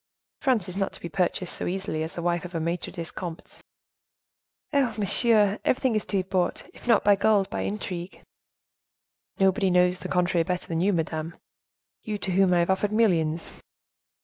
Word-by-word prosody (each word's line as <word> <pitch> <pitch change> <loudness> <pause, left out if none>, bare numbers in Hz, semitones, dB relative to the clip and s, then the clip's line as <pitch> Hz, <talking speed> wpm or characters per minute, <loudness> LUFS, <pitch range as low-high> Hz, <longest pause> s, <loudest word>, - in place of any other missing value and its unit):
France 245 - +1
is 180 - -6
not 195 0 -1
to - - -11
be 170 - -6
purchased 180 +1 -1
so - - -4
easily 180 -4 -3
as 160 +1 -5
the 170 - -4
wife 175 -1 0
of 180 -1 -8
a - - 0
maitre 170 +2 -2
des 170 -1 -6
comptes." 170 -3 -8 1.1
"Eh! 275 -4 +3
monsieur, 210 0 +4
everything 255 -1 +1
is 215 - 0
to 200 - -1
be - - +2
bought; 185 -1 -1
if - - -15
not 230 -3 +4
by 205 0 +5
gold, 200 -1 +3
by - - -2
intrigue." 185 -3 -5 1.2
"Nobody 195 0 +3
knows 180 0 +3
to - - -6
the - - -12
contrary 180 -1 +2
better 180 +1 -3
than 165 0 -1
you, 200 +3 +3
madame, 160 -2 -2 0.7
you 215 -1 -4
to 195 - -2
whom 190 0 +3
I 175 - +4
have 170 +2 +2
offered 195 +2 0
millions." 170 -8 +1
185 Hz, 190 wpm, -26 LUFS, 170-205 Hz, 1.2 s, by